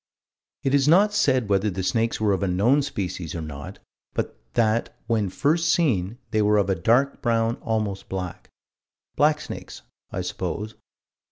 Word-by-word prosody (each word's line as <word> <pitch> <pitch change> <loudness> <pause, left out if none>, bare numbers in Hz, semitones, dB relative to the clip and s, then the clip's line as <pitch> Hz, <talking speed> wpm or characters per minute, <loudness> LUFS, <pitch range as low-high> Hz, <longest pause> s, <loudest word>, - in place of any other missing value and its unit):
It 135 - +1
is 140 -1 +4
not 200 +6 +5
said 130 - +2
whether 100 +1 +2
the 95 -1 -3
snakes 115 +4 0
were 105 -2 +2
of 95 - -1
a 100 - +1
known 110 +11 +3
species 90 - -4
or 85 - -3
not, 75 -2 -8 0.4
but - - -2 0.2
that 115 -1 +1
"when 110 -4 0
first 160 - +1
seen, 115 - +1
they 110 -1 +2
were 105 0 +4
of 100 -1 +2
a - - +2
dark 120 +11 +2
brown, 115 -1 +1
almost 105 -3 -2
black." 90 -2 -5 0.7
Blacksnakes, 150 +1 -1 0.3
I - - -3
suppose. 110 +1 -4
110 Hz, 160 wpm, -24 LUFS, 95-135 Hz, 0.7 s, not